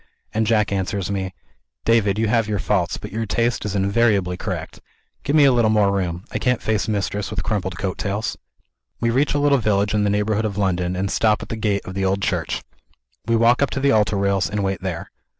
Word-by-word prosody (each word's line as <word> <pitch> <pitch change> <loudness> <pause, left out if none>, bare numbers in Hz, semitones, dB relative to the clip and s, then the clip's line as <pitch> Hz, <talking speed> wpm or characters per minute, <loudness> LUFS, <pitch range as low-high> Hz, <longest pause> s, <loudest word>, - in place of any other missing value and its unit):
And 110 0 +1
Jack 105 -2 +2
answers 100 0 -2
me, 95 -2 -2 0.5
"David, 105 -3 +3
you 110 0 +1
have 115 0 +2
your 105 -1 -1
faults; 95 -2 0
but - - -8
your 110 +2 -3
taste 115 +2 0
is 105 -1 -3
invariably 100 -2 +2
correct. - - -5 0.4
Give 140 - 0
me 150 -2 +7
a 135 - +6
little 120 -3 +3
more 105 -2 +3
room; 90 -3 -2
I - - -2
can't 125 -2 +1
face 110 -2 -1
Mistress 100 -1 -2
with 100 -3 -3
crumpled 95 -4 -2
coat 95 0 -3
tails." 105 +2 -2 0.6
We 115 - +1
reach 140 +5 +1
a - - +2
little 145 -1 +3
village 105 -2 +1
in 105 -1 +2
the 105 - +2
neighborhood 105 +1 +1
of 105 -2 -3
London, 90 -2 0
and 95 +1 -2
stop 105 -1 +2
at - - -10
the - - -3
gate 105 -2 -1
of 95 - -7
the 95 0 -2
old 95 +1 0
church. - - -1 0.6
We 115 - +3
walk 115 +3 +4
up 140 - +3
to - - -3
the 140 0 +3
altar 105 -1 +2
rails, 100 -1 +1
and 105 0 -2
wait 95 -1 -2
there. 90 -3 -5
105 Hz, 225 wpm, -21 LUFS, 95-115 Hz, 0.6 s, me